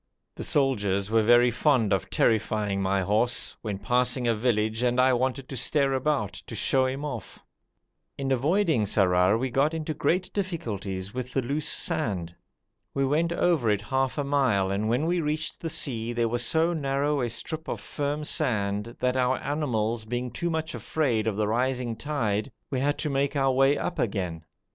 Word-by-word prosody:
The -, -, -7 dB
soldiers 105 Hz, -8 st, +1 dB
were 115 Hz, 0 st, +4 dB
very 120 Hz, +2 st, +5 dB
fond 125 Hz, -5 st, +2 dB
of 95 Hz, -, -1 dB
terrifying 105 Hz, -3 st, +1 dB
my 95 Hz, 0 st, +1 dB
horse, 110 Hz, +6 st, +1 dB
when 105 Hz, -3 st, -3 dB
passing 125 Hz, +4 st, +1 dB
a 115 Hz, -, +3 dB
village 110 Hz, -1 st, 0 dB
and 125 Hz, 0 st, +1 dB
I 130 Hz, 0 st, +5 dB
wanted 130 Hz, +2 st, -1 dB
to 135 Hz, -, -5 dB
stare 135 Hz, +2 st, +2 dB
about, 130 Hz, -7 st, 0 dB
to 115 Hz, -, -7 dB
show 130 Hz, +5 st, +2 dB
him 135 Hz, +3 st, -4 dB
off. 125 Hz, -8 st, -7 dB, 0.7 s
In 135 Hz, -1 st, -2 dB
avoiding 150 Hz, -, +2 dB
Sarrar 95 Hz, 0 st, +3 dB
we 130 Hz, +2 st, -2 dB
got 145 Hz, +6 st, +2 dB
into 155 Hz, -1 st, -3 dB
great 175 Hz, +6 st, 0 dB
difficulties 105 Hz, -, -3 dB
with 125 Hz, 0 st, -5 dB
the 135 Hz, -, 0 dB
loose 140 Hz, +5 st, -2 dB
sand. 90 Hz, -6 st, -2 dB, 0.6 s
We 135 Hz, -, +2 dB
went 160 Hz, +5 st, +1 dB
over 170 Hz, -9 st, +2 dB
it 105 Hz, -1 st, +1 dB
half 130 Hz, +6 st, -1 dB
a 145 Hz, -, 0 dB
mile, 130 Hz, -9 st, +1 dB
and 105 Hz, +3 st, -1 dB
when 125 Hz, +7 st, +1 dB
we 175 Hz, +1 st, +1 dB
reached 155 Hz, +1 st, -2 dB
the 165 Hz, -, -4 dB
sea 120 Hz, -6 st, -1 dB
there 120 Hz, -1 st, +1 dB
was 120 Hz, +1 st, 0 dB
so 165 Hz, +7 st, +2 dB
narrow 140 Hz, -1 st, 0 dB
a 120 Hz, -, -1 dB
strip 160 Hz, +7 st, -5 dB
of -, -, -3 dB
firm 145 Hz, +1 st, -3 dB
sand 105 Hz, -7 st, -1 dB
that, 125 Hz, 0 st, +1 dB
our 130 Hz, 0 st, +2 dB
animals 120 Hz, -7 st, -1 dB
being 120 Hz, +2 st, -3 dB
too 170 Hz, +8 st, -2 dB
much 160 Hz, -1 st, -2 dB
afraid 120 Hz, -9 st, -1 dB
of 110 Hz, -, 0 dB
the 105 Hz, 0 st, 0 dB
rising 125 Hz, +1 st, 0 dB
tide, 115 Hz, -3 st, -2 dB, 0.2 s
we 130 Hz, -, 0 dB
had 145 Hz, +2 st, +1 dB
to 150 Hz, -, -2 dB
make 140 Hz, +1 st, 0 dB
our 135 Hz, -1 st, +3 dB
way 135 Hz, +2 st, +3 dB
up 175 Hz, -, -3 dB
again. 90 Hz, -7 st, -2 dB
125 Hz, 185 wpm, -27 LUFS, 110-145 Hz, 0.7 s, very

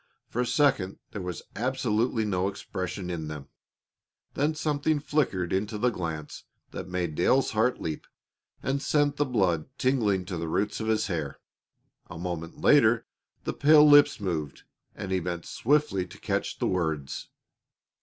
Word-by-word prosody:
For 120 Hz, -, -1 dB
a 125 Hz, -, -1 dB
second 130 Hz, -11 st, +2 dB
there 100 Hz, -, -5 dB
was 90 Hz, -3 st, -5 dB
absolutely 120 Hz, -1 st, 0 dB
no 95 Hz, -2 st, 0 dB
expression 95 Hz, -2 st, -4 dB
in 80 Hz, -3 st, -4 dB
them. 75 Hz, -3 st, -7 dB, 0.8 s
Then 150 Hz, +3 st, 0 dB
something 150 Hz, 0 st, 0 dB
flickered 140 Hz, -, 0 dB
into 105 Hz, +3 st, -1 dB
the 120 Hz, +3 st, +2 dB
glance 80 Hz, -7 st, -5 dB, 0.3 s
that -, -, -6 dB
made 90 Hz, -3 st, -2 dB
Dale's 130 Hz, -, +2 dB
heart 115 Hz, +3 st, +1 dB
leap 80 Hz, -2 st, -5 dB, 0.6 s
and 135 Hz, +1 st, 0 dB
sent 145 Hz, 0 st, +1 dB
the 145 Hz, -, +1 dB
blood 95 Hz, -9 st, +1 dB
tingling 105 Hz, -8 st, +1 dB
to 90 Hz, -2 st, -4 dB
the 85 Hz, -, -3 dB
roots 100 Hz, +6 st, -1 dB
of 110 Hz, -, -3 dB
his 110 Hz, 0 st, +2 dB
hair. 80 Hz, -7 st, -3 dB, 0.7 s
A 80 Hz, -, -8 dB
moment 85 Hz, -1 st, -5 dB
later 120 Hz, -6 st, +5 dB, 0.4 s
the -, -, -2 dB
pale 150 Hz, +1 st, +6 dB
lips 145 Hz, -3 st, +7 dB
moved, 80 Hz, -7 st, -3 dB, 0.3 s
and 95 Hz, -, -6 dB
he 95 Hz, -, +2 dB
bent 85 Hz, -1 st, -4 dB
swiftly 130 Hz, -9 st, +1 dB
to 85 Hz, -, -13 dB
catch -, -, -2 dB
the -, -, -1 dB
words. 80 Hz, -6 st, -2 dB
100 Hz, 155 wpm, -27 LUFS, 85-130 Hz, 0.8 s, lips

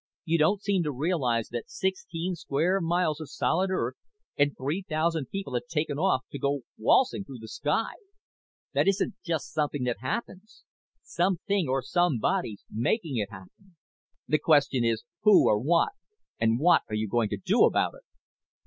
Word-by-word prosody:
You 165 Hz, 0 st, +1 dB
don't 195 Hz, +7 st, +2 dB
seem 200 Hz, -3 st, +1 dB
to 150 Hz, -3 st, -1 dB
realize 130 Hz, -6 st, 0 dB
that 120 Hz, -1 st, -5 dB
sixteen 185 Hz, -2 st, -2 dB
square 170 Hz, +4 st, 0 dB
miles 165 Hz, -2 st, 0 dB
of 155 Hz, -, -7 dB
solid 185 Hz, +3 st, 0 dB
earth, 185 Hz, -, -1 dB, 0.4 s
and 145 Hz, 0 st, +1 dB
three 145 Hz, +8 st, -2 dB
thousand 155 Hz, -2 st, 0 dB
people, 195 Hz, -7 st, -5 dB
have 125 Hz, +5 st, -2 dB
taken 150 Hz, -3 st, -2 dB
off 180 Hz, -8 st, +2 dB
to 140 Hz, -, -6 dB
go 140 Hz, 0 st, 0 dB
waltzing 200 Hz, -, +3 dB
through 135 Hz, -8 st, -10 dB
the 110 Hz, -1 st, -10 dB
sky. 150 Hz, -, -1 dB, 0.8 s
That -, -, +2 dB
isn't 195 Hz, 0 st, +1 dB
just 165 Hz, -4 st, -3 dB
something 150 Hz, -3 st, -1 dB
that 120 Hz, -4 st, -1 dB
happens. 190 Hz, -, -5 dB, 0.4 s
Something 185 Hz, 0 st, 0 dB
or 130 Hz, 0 st, 0 dB
somebody's 175 Hz, -, 0 dB
making 135 Hz, -, -1 dB
it 105 Hz, -3 st, -1 dB
happen. 110 Hz, -, -15 dB, 0.5 s
The 155 Hz, -, +2 dB
question 145 Hz, -5 st, +3 dB
is 115 Hz, -1 st, 0 dB, 0.2 s
who 210 Hz, -2 st, +6 dB
or 105 Hz, -, +3 dB
what, 165 Hz, -, +2 dB, 0.5 s
and 115 Hz, 0 st, +2 dB
what 175 Hz, +4 st, +5 dB
are 105 Hz, -, -2 dB
you 110 Hz, 0 st, -1 dB
going 115 Hz, +1 st, +1 dB
to 105 Hz, -, -3 dB
do 100 Hz, -, +3 dB
about -, -, +1 dB
it?" -, -, -15 dB
155 Hz, 165 wpm, -27 LUFS, 125-180 Hz, 0.8 s, who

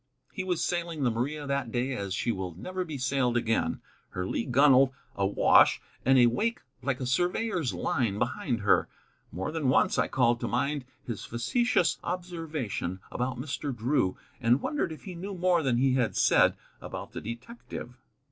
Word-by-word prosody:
He 190 Hz, -, -3 dB
was 180 Hz, -3 st, -1 dB
sailing 170 Hz, -4 st, -2 dB
the 125 Hz, -, +3 dB
Maria 145 Hz, +6 st, -2 dB
that 140 Hz, -4 st, -2 dB
day 125 Hz, +3 st, -1 dB
as 100 Hz, -5 st, -3 dB
she 120 Hz, -, 0 dB
will 95 Hz, -5 st, -4 dB
never 185 Hz, -, -4 dB
be 155 Hz, -5 st, -6 dB
sailed 125 Hz, -1 st, +1 dB
again: 115 Hz, -8 st, 0 dB, 0.3 s
her 90 Hz, -, -4 dB
lee 115 Hz, -, -2 dB
gunwale 135 Hz, 0 st, +5 dB, 0.2 s
awash, 100 Hz, 0 st, +5 dB, 0.2 s
and 135 Hz, +1 st, +5 dB
a 125 Hz, -, +7 dB
wake 220 Hz, -, 0 dB, 0.2 s
like 140 Hz, -3 st, -1 dB
a 130 Hz, -, -3 dB
surveyor's 175 Hz, -, 0 dB
line 115 Hz, -6 st, -1 dB
behind 125 Hz, -, -1 dB
her. 100 Hz, -, +3 dB, 0.4 s
More 95 Hz, +3 st, -3 dB
than 155 Hz, -5 st, 0 dB
once 130 Hz, -, +3 dB
I -, -, +2 dB
called 120 Hz, -2 st, +2 dB
to -, -, -2 dB
mind 140 Hz, +2 st, -1 dB, 0.2 s
his 115 Hz, -4 st, -5 dB
facetious 180 Hz, -, +1 dB
observation 160 Hz, -, -4 dB
about 125 Hz, 0 st, -2 dB
Mr. 140 Hz, 0 st, -4 dB
Drew, 115 Hz, -5 st, +1 dB, 0.2 s
and 120 Hz, +1 st, +3 dB
wondered 290 Hz, -, -1 dB
if 155 Hz, -, -9 dB
he 190 Hz, -, -7 dB
knew 190 Hz, +3 st, -6 dB
more 175 Hz, -1 st, +3 dB
than 130 Hz, -5 st, +1 dB
he 130 Hz, +1 st, +3 dB
had 120 Hz, -7 st, +1 dB
said -, -, +4 dB, 0.3 s
about -, -, -7 dB
the -, -, -6 dB
detective. 120 Hz, -, -8 dB
130 Hz, 175 wpm, -28 LUFS, 120-165 Hz, 0.4 s, a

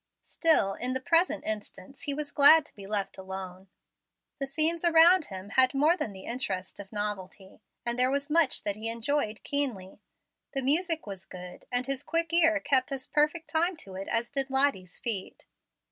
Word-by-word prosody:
Still, 315 Hz, -, +2 dB
in 250 Hz, +4 st, -3 dB
the 260 Hz, -, -1 dB
present 335 Hz, +7 st, +1 dB
instance, 215 Hz, +3 st, -6 dB
he 285 Hz, -, -1 dB
was 295 Hz, 0 st, -5 dB
glad 295 Hz, +2 st, +7 dB
to -, -, -13 dB
be 195 Hz, -2 st, -11 dB
left 200 Hz, -2 st, -3 dB
alone. 190 Hz, 0 st, -8 dB, 0.7 s
The 275 Hz, -, -3 dB
scenes 320 Hz, +4 st, +1 dB
around 340 Hz, 0 st, +5 dB
him 190 Hz, -2 st, -9 dB
had 260 Hz, +4 st, +3 dB
more 300 Hz, +5 st, +3 dB
than 300 Hz, -, -4 dB
the 190 Hz, -1 st, -12 dB
interest 190 Hz, -7 st, -4 dB
of 200 Hz, -1 st, -10 dB
novelty, 205 Hz, -1 st, -5 dB, 0.2 s
and 240 Hz, +1 st, 0 dB
there 255 Hz, +1 st, +4 dB
was 280 Hz, +1 st, -1 dB
much 320 Hz, -2 st, +2 dB
that 205 Hz, -, -2 dB
he 220 Hz, +2 st, -2 dB
enjoyed 230 Hz, -1 st, -2 dB
keenly. 230 Hz, -10 st, -2 dB, 0.5 s
The 270 Hz, -, -1 dB
music 325 Hz, +4 st, +1 dB
was 195 Hz, -2 st, -8 dB
good, 180 Hz, 0 st, -11 dB
and 245 Hz, 0 st, -1 dB
his 270 Hz, 0 st, -3 dB
quick 330 Hz, +1 st, -1 dB
ear 325 Hz, -2 st, +4 dB
kept 265 Hz, -2 st, +1 dB
as 270 Hz, -1 st, -4 dB
perfect 305 Hz, +2 st, 0 dB
time 335 Hz, +2 st, 0 dB
to 195 Hz, -11 st, -9 dB
it 190 Hz, +1 st, -7 dB
as 235 Hz, 0 st, -2 dB
did 275 Hz, -1 st, +1 dB
Lottie's 265 Hz, -9 st, +1 dB
feet. 210 Hz, -5 st, -2 dB
260 Hz, 185 wpm, -28 LUFS, 200-305 Hz, 0.7 s, glad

